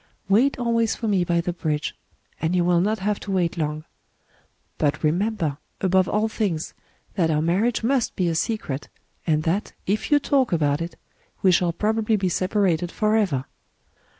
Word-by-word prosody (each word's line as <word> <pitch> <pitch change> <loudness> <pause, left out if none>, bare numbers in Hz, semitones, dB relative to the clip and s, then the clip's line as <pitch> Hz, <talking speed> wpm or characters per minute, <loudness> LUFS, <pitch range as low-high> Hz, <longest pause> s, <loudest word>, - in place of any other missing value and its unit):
Wait 230 +8 +3
always 230 -2 +1
for 230 - -4
me 195 -4 +2
by 170 0 +1
the 175 +1 -2
bridge; 155 -3 -2 0.5
and 165 +2 +1
you 175 -1 +2
will 175 -1 +3
not 215 +4 +1
have 210 0 -1
to - - -9
wait 180 -3 +1
long. 155 -2 -2 1.0
But 150 +1 0
remember, 170 -2 0 0.2
above 190 -1 +2
all 215 +1 +1
things, 195 -8 -2 0.4
that 170 -5 +1
our 150 -1 +2
marriage 195 +10 +1
must 255 0 +1
be 180 - +1
a 165 - +1
secret, 160 -6 -2 0.4
and 155 -1 +2
that, 180 +6 -1
if 205 +3 -1
you 295 - +6
talk 275 -2 +1
about 150 -2 +1
it, 170 +1 -5 0.5
we 190 - +6
shall 175 0 +3
probably 220 +4 +1
be 190 -3 0
separated 180 -2 +1
forever. 210 -11 +1
185 Hz, 170 wpm, -24 LUFS, 165-215 Hz, 1.0 s, you